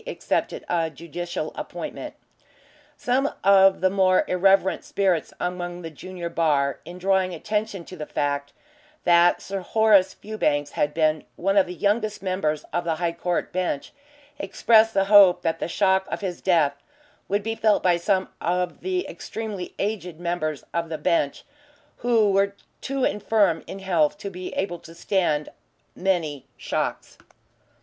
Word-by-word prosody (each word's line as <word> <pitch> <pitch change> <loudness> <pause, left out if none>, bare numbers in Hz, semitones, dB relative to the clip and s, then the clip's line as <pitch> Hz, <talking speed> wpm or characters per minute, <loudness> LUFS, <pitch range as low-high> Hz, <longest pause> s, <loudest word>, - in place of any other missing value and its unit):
accepted - - -2
a 165 -2 0
judicial 170 +3 -5
appointment. - - -6 0.8
Some 265 +3 +1
of 195 0 +6
the 185 - +4
more 190 -1 +3
irreverent 190 +1 +3
spirits 190 -5 0
among 180 0 -4
the 165 - -6
junior 180 +2 -7
bar, 145 -5 +1
in 175 - -9
drawing 190 -1 +1
attention 210 0 -3
to 185 - -10
the 155 -3 -7
fact 145 0 -2 0.5
that 175 0 +4
Sir 195 0 -4
Horace 205 0 +3
Fewbanks 145 -9 -1
had 150 0 -1
been 155 -1 +2
one 195 +2 0
of 195 -2 +4
the 180 - -6
youngest 210 +2 0
members 170 -6 -1
of 175 - 0
the 165 -2 -1
High 170 +1 -1
Court 175 +1 -2
Bench, 180 -6 -2 0.5
expressed 220 +3 +3
the 195 0 +3
hope 200 -3 +7
that 165 -1 0
the - - -2
shock 190 +1 +2
of - - -4
his 185 -3 -4
death 165 -6 +3 0.5
would 205 +1 0
be 225 +1 -2
felt 220 -2 +2
by 175 -2 +4
some 185 +2 +1
of 180 0 -1
the 370 -1 -2
extremely 210 -5 -6
aged 180 -5 -3
members 170 -4 -2
of 165 -1 -2
the 160 - -3
bench 150 -1 0 0.5
who 225 -4 +3
were 200 +1 +2 0.3
too 275 -1 -2
infirm 205 -7 +2
in - - -7
health 180 -4 +1
to 200 -1 -6
be 180 0 -7
able 175 -3 -2
to 165 0 -14
stand 170 -5 0 0.5
many 165 -7 -1
shocks. - - -3
185 Hz, 155 wpm, -24 LUFS, 165-200 Hz, 0.8 s, hope